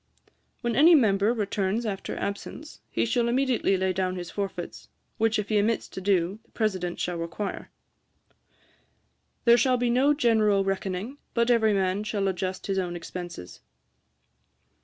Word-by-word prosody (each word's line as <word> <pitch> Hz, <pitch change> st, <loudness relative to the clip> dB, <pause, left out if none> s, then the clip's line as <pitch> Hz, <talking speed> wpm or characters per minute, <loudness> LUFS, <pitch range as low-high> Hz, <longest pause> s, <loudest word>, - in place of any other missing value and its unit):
'When 240 Hz, -2 st, -1 dB
any 330 Hz, +6 st, +7 dB
member 210 Hz, -5 st, +3 dB
returns 210 Hz, 0 st, -1 dB
after 200 Hz, -3 st, -4 dB
absence, 245 Hz, +9 st, -6 dB
he -, -, 0 dB
shall 235 Hz, +1 st, +1 dB
immediately 245 Hz, -5 st, +1 dB
lay 185 Hz, 0 st, 0 dB
down 185 Hz, 0 st, -1 dB
his 175 Hz, -2 st, -6 dB
forfeits; 195 Hz, -4 st, -5 dB, 0.3 s
which 225 Hz, 0 st, +2 dB
if 210 Hz, -1 st, -3 dB
he 215 Hz, -1 st, +3 dB
omits 220 Hz, +2 st, 0 dB
to 190 Hz, -, -7 dB
do, 190 Hz, 0 st, +1 dB
the -, -, -32 dB
President 185 Hz, -6 st, -1 dB
shall 175 Hz, -1 st, -2 dB
require. 170 Hz, +5 st, -5 dB, 1.8 s
'There 235 Hz, 0 st, +7 dB
shall 255 Hz, -2 st, +3 dB
be 245 Hz, -1 st, +1 dB
no 275 Hz, +4 st, +3 dB
general 220 Hz, -7 st, +3 dB
reckoning, 195 Hz, +6 st, -3 dB, 0.2 s
but 235 Hz, +1 st, +3 dB
every 220 Hz, -3 st, +4 dB
man 190 Hz, +1 st, 0 dB
shall 210 Hz, -2 st, -1 dB
adjust 185 Hz, 0 st, -3 dB
his 195 Hz, -1 st, 0 dB
own 175 Hz, -2 st, -3 dB
expences. 175 Hz, -, -8 dB
205 Hz, 150 wpm, -26 LUFS, 185-235 Hz, 1.8 s, any